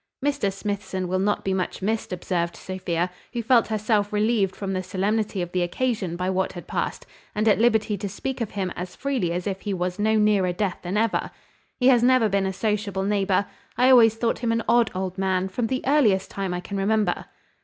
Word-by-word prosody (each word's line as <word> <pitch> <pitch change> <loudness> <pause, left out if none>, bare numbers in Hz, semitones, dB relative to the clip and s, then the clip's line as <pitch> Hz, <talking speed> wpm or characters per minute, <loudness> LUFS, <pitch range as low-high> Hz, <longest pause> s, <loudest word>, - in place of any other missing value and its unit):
"Mr 280 -9 +1
Smithson 195 -2 -3
will 185 +1 0
not 205 +2 0
be 190 - +1
much 185 0 -3
missed," 220 +2 -1
observed 175 -1 -2
Sophia, 180 -2 -3 0.2
who 235 -1 -2
felt 235 +1 +4
herself 215 -1 0
relieved 210 -2 +1
from 195 -1 -4
the 185 - -1
solemnity 200 +1 -1
of 175 - -7
the 180 - 0
occasion, 190 -1 -1
by 180 +1 -2
what 190 0 0
had 175 - -8
passed, - - -3 0.3
and 215 +1 +1
at 210 - +4
liberty 220 -2 +3
to 200 0 -3
speak 255 +6 -4
of 225 - -1
him 190 -3 -3
as 180 0 -6
freely 260 -11 -1
as 175 +1 -3
if 195 -2 -3
he 205 -2 -2
was 180 +1 -3
no 220 +1 +2
nearer 210 -4 +3
death 195 0 -2
than 185 +3 -3
ever. 225 0 +1 0.5
"He 255 0 +5
has 245 -3 +5
never 250 -2 +4
been 195 -1 +1
a - - -1
sociable 205 -1 -1
neighbour. 200 -1 +1 0.3
I 255 +1 +5
always 225 -3 +7
thought 230 0 -1
him 235 -2 0
an 230 0 0
odd 235 0 +4
old 185 0 -3
man, 190 -1 0
from 225 +4 -1
the 260 +2 -2
earliest 230 -9 +3
time 195 -2 -3
I 180 0 -3
can 200 +2 -5
remember." 205 -2 +1
200 Hz, 215 wpm, -24 LUFS, 185-225 Hz, 0.5 s, always